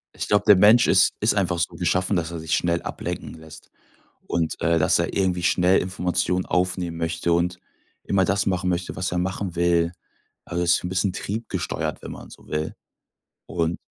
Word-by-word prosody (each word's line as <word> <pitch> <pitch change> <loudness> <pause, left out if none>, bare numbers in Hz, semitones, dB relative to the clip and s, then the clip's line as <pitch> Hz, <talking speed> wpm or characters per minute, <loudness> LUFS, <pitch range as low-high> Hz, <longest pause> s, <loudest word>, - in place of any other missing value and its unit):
Ich - - -4
glaub, 105 0 +2
der 105 - +8
Mensch 110 +6 +6
ist 95 - +4
ist 105 - +2
einfach 90 -4 0
so 85 +1 -1
geschaffen, 90 +3 0
dass 85 -2 -1
er 85 - -5
sich 80 0 -1
schnell 85 -1 0
ablenken - - -5
lässt 80 -1 -13 0.6
und, 85 -2 -1
äh, 85 0 +2
dass 80 - +3
er 85 - -1
irgendwie 90 -2 0
schnell 90 +2 +3
Informationen 90 0 -1
aufnehmen 90 -2 -1
möchte, 85 +1 -1
und 85 +1 0 0.5
immer 95 -1 +2
das 100 +2 +1
machen 95 -1 0
möchte, 90 0 -2
was 95 0 -2
er 90 - -1
machen 95 0 -3
will. 85 -1 +2 0.5
Also 85 0 -2
so 85 +1 +2
'n - - -5
bisschen 95 +1 0
triebgesteuert, 100 -3 -4
wenn - - -8
man - - -10
so - - -15
will. 75 0 -3 0.7
Und, 85 -1 -2
90 Hz, 185 wpm, -23 LUFS, 85-95 Hz, 0.7 s, der